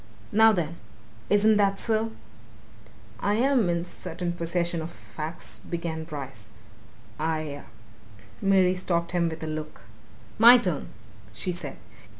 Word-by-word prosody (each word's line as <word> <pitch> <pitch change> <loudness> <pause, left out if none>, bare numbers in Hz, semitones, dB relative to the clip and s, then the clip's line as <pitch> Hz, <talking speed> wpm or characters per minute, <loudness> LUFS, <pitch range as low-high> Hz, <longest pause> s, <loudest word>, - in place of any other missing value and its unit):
Now, 220 +1 +7
then 170 -4 -2 0.5
isn't 210 +1 +5
that 200 -1 +3
so?" 225 +1 +1 1.1
"I 205 +1 +1
am 245 -4 +3
in 170 0 0
possession 175 0 -5
of 175 - -9
certain 170 -1 -1
facts," 160 -1 -7
began 165 -2 -4
Bryce. 135 -8 -8 0.7
"I 155 -2 -2 0.4
" 105 0 -22
Mary 190 -2 +4
stopped 170 -2 -1
him 175 -2 +1
with 160 0 -6
a - - -3
look. 155 0 -5 0.6
"My 240 +2 +10
turn!" 180 - -2 0.5
she 180 - -3
said. 170 -5 -6
170 Hz, 130 wpm, -26 LUFS, 155-195 Hz, 1.1 s, My